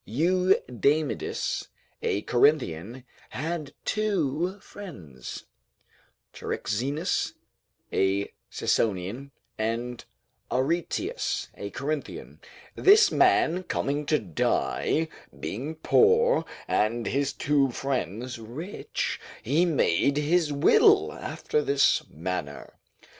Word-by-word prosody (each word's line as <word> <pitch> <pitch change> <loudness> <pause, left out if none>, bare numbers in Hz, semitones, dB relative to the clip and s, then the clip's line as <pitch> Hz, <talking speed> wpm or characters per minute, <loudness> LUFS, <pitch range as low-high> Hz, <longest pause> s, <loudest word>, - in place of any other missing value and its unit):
Eudamidas, 155 - +1 0.3
a 100 - -1
Corinthian, 120 - +1 0.3
had 155 0 -4
two 190 -4 0
friends, 80 - -9 0.9
Charixenus 140 - -2 0.6
a 95 +1 +1 0.2
Sicyonian 105 +6 -1 0.3
and 115 +2 -2 0.5
Areteus 155 +7 -1
a 100 - -6
Corinthian; 145 +6 -5 0.3
this 405 +1 +6
man 270 - +3
coming 145 -5 -2
to 155 - +3
die, 115 - 0 0.3
being 140 +9 -4
poor, 460 - +4 0.2
and 115 +2 +1
his 140 +1 0
two 140 -1 +2
friends 125 - -3
rich, 135 - -4 0.2
he 150 +9 +3
made 140 - +2
his 155 +1 +2
will 140 0 +5
after 150 - -2
this 140 -1 +3
manner. 80 -3 -5
140 Hz, 85 wpm, -27 LUFS, 115-165 Hz, 0.9 s, this